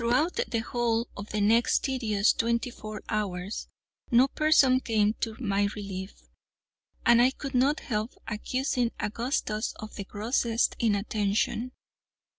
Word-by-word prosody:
Throughout 255 - +1
the 230 - -1
whole 235 0 0
of 200 +1 -8
the 215 - -2
next 225 +3 +3
tedious 220 -6 +2
twenty 235 +1 0
four 215 -2 -8
hours 200 -2 -3 0.4
no 245 +3 +5
person 285 -4 +4
came 215 -4 +1
to 225 -2 -2
my 200 -4 +1
relief, 195 -2 -7 0.8
and 235 0 +6
I 250 - +6
could 275 +1 -7
not 270 +4 +2
help 215 -1 -3
accusing 245 +2 -1
Augustus 220 -1 -2
of 215 0 -9
the 200 - -5
grossest 225 +3 0
inattention. 215 +2 0
230 Hz, 130 wpm, -28 LUFS, 210-250 Hz, 0.8 s, and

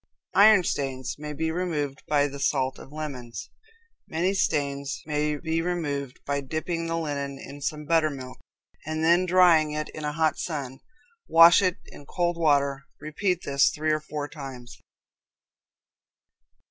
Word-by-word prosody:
Iron 205 -1 +7
Stains 135 -5 -3
may 150 0 -6
be 160 +2 -2
removed 155 -5 -2
by 145 -1 +3
the 140 0 -8
salt 135 -1 0
of 135 - -13
lemons. 125 -7 -7 0.6
Many 175 +4 0
stains 140 -6 -1
may 150 0 -1
be 160 +2 -1
removed 145 -6 -3
by 140 0 -1
dipping 165 +4 -3
the 165 0 -1
linen 140 -3 -3
in 140 +1 -10
some 150 +1 -3
buttermilk, 145 -5 0 0.4
and 155 +1 -3
then 175 +3 +4
drying 170 -4 +5
it 150 0 -3
in 155 - -8
a 150 - -1
hot 160 0 +1
sun; 135 -6 -4 0.5
wash 165 +3 +8
it 185 -3 +1
in 145 - -14
cold 175 -1 0
water; 140 -4 +1
repeat 175 +4 -2
this 140 0 +3
three 155 +1 -1
or 155 - +1
four 150 -1 -5
times. 135 -5 -9
150 Hz, 145 wpm, -26 LUFS, 140-165 Hz, 0.6 s, wash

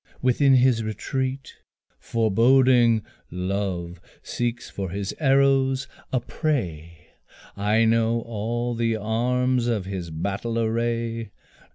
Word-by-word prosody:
Within 130 +2 +4
his 125 -3 +3
retreat, 130 +5 -4 0.4
Foreboding, 115 +1 +3 0.3
Love 90 -1 -3 0.2
seeks 120 0 -3
for 95 -2 -5
his 100 +2 -4
arrows 135 -2 +3 0.2
a 130 - +2
prey, 85 - -4 0.5
I 105 +3 +2
know 115 +1 +2
all 115 +2 -3
the 115 -1 0
arms 120 +3 0
of 110 -6 -1
his 95 -3 -5
battle 100 +8 -3
array. 115 0 -1
115 Hz, 100 wpm, -24 LUFS, 100-125 Hz, 0.5 s, Within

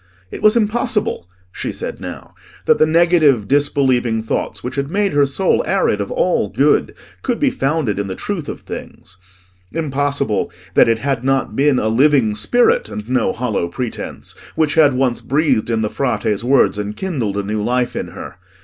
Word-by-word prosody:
It - - -7
was 215 +2 +5
impossible, 215 - -1 0.2
she - - -4
said - - -6
now, - - -8 0.3
that - - +3
the 155 - +5
negative 155 - +3
disbelieving 130 -5 +1
thoughts 110 - -3
which 125 - -4
had 140 0 -2
made 200 +2 0
her 145 -1 +3
soul 185 +8 +1
arid - - +1
of - - -4
all - - 0
good, - - +2 0.3
could 245 -3 -2
be 280 -3 +2
founded 135 - -1
in 100 - -2
the 95 - -5
truth 175 - -4
of - - -6
things: 95 - -9 0.5
impossible 140 -8 -1 0.2
that - - +5
it 115 - +2
had 135 0 -2
not 135 -4 0
been 140 0 +3
a 110 - 0
living 125 -1 +3
spirit, 110 - +2
and 105 0 -7
no 130 -2 +1
hollow 110 -7 -2
pretence, 115 +7 -6 0.2
which 155 -2 +1
had 150 -5 +4
once 125 -2 0
breathed 135 -5 +1
in 115 -1 0
the 110 - 0
Frate's 110 -4 -1
words, 125 -4 +3
and 105 0 -4
kindled 130 - -2
a 100 - -1
new 105 +1 -2
life 125 +3 0
in - - -3
her. - - -10
135 Hz, 180 wpm, -18 LUFS, 110-155 Hz, 0.5 s, was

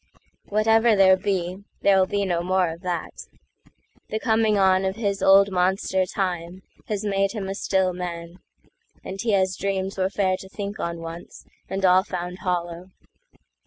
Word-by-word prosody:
Whatever 225 +2 +3
there 190 -1 +6
be, 185 -1 -3 0.2
there'll 190 -2 +4
be 200 +1 -1
no 175 -2 0
more 185 0 +1
of 165 +1 -10
that; 175 -3 -5 0.8
The 215 - -2
coming 220 -2 +2
on 190 -1 +3
of 190 0 -1
his 200 -3 -2
old 195 +1 +6
monster 185 +1 +1
TimeHas 185 +3 -5
made 195 0 0
him 205 -4 -4
a 195 - -3
still 190 -2 0
man; 175 0 -6 0.6
and 195 +1 -6
he 230 -3 0
has 190 -1 +2
dreamsWere 195 -1 -2
fair 190 -2 +1
to 190 - -12
think 205 +1 -6
on 170 0 -4
once, 165 +1 -9 0.2
and 190 0 -1
all 185 +1 +5
found 180 -1 -5
hollow. 175 -1 -3
190 Hz, 155 wpm, -24 LUFS, 180-200 Hz, 0.8 s, there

